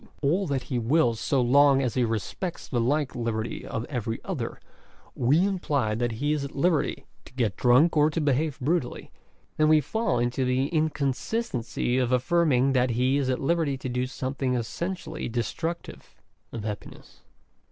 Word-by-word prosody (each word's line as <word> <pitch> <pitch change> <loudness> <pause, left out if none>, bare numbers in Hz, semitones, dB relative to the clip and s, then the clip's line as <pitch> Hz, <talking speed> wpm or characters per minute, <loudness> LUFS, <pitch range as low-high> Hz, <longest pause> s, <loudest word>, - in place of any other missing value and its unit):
all 175 +7 +2
that 135 -3 -1
he 125 -3 -2
wills 120 -2 +2
so 140 - +1
long 135 +2 +5
as 125 -4 0
he 125 - +1
respects 115 - -3
the 120 -3 0
like 145 +4 0
liberty 115 -3 -3
of 115 - -3
every 120 -5 -3
other, 150 -12 -4 0.5
we 145 +9 +3
imply 150 - 0
that 120 +1 -1
he 145 +7 -1
is 150 -2 -1
at 140 - -7
liberty 165 +1 +1 0.2
to - - -15
get 115 -7 0
drank 130 +8 +4
or 150 0 +5
to 160 - -2
behave 150 0 0
brutally, 145 -1 -2 0.5
then 155 - +4
we 155 0 +6
fall 220 - -1
into 120 +2 0
the 130 +2 +1
inconsistency 140 - -1
of 125 -1 0
affirming 135 0 +3
that 125 -1 +2
he 125 +4 +2
is 135 -2 0
at 130 - 0
liberty 155 -2 0
to 130 - -5
do 125 +1 -1
something 130 0 -2
essentially 160 +7 -4
destructive 160 +9 -4 0.4
of 115 - -6
happiness. 105 -1 -8
135 Hz, 165 wpm, -26 LUFS, 120-155 Hz, 0.5 s, we